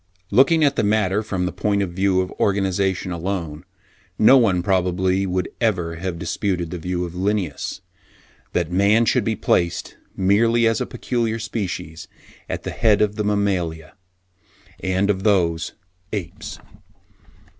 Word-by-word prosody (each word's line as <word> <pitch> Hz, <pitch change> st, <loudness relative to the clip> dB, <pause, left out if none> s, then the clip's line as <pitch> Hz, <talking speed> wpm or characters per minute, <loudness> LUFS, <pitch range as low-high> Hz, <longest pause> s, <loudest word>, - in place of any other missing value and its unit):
Looking 145 Hz, +9 st, +5 dB
at 140 Hz, -2 st, +2 dB
the -, -, +2 dB
matter 105 Hz, -1 st, +2 dB
from 95 Hz, -4 st, -2 dB
the 90 Hz, -, -2 dB
point 100 Hz, -1 st, 0 dB
of 90 Hz, -, -4 dB
view 95 Hz, +1 st, +2 dB
of 90 Hz, -, -4 dB
organisation 95 Hz, -2 st, 0 dB
alone, 85 Hz, -2 st, -4 dB, 0.5 s
no 110 Hz, +5 st, +7 dB
one 100 Hz, -9 st, +3 dB
probably 95 Hz, 0 st, +1 dB
would 90 Hz, 0 st, -1 dB
ever 90 Hz, -8 st, 0 dB
have 90 Hz, 0 st, -4 dB
disputed 90 Hz, -1 st, -2 dB
the 90 Hz, -, -4 dB
view 90 Hz, +1 st, -2 dB
of 85 Hz, -, -8 dB
Linnaeus, 95 Hz, -5 st, -2 dB, 0.7 s
that 85 Hz, -1 st, 0 dB
man 100 Hz, +5 st, +4 dB
should 125 Hz, 0 st, +2 dB
be 110 Hz, +1 st, 0 dB
placed, 85 Hz, -3 st, 0 dB, 0.2 s
merely 115 Hz, +5 st, +3 dB
as 115 Hz, -1 st, +2 dB
a -, -, -2 dB
peculiar 115 Hz, -2 st, -2 dB
species, 90 Hz, -7 st, -5 dB, 0.4 s
at -, -, -4 dB
the -, -, -4 dB
head 110 Hz, -3 st, +3 dB
of 105 Hz, 0 st, -1 dB
the 105 Hz, -, -1 dB
mammalia 90 Hz, -6 st, -1 dB, 0.9 s
and 95 Hz, +2 st, +1 dB
of 95 Hz, -1 st, -3 dB
those 85 Hz, -5 st, +1 dB, 0.4 s
apes. 90 Hz, -5 st, -5 dB
95 Hz, 145 wpm, -22 LUFS, 90-105 Hz, 0.9 s, no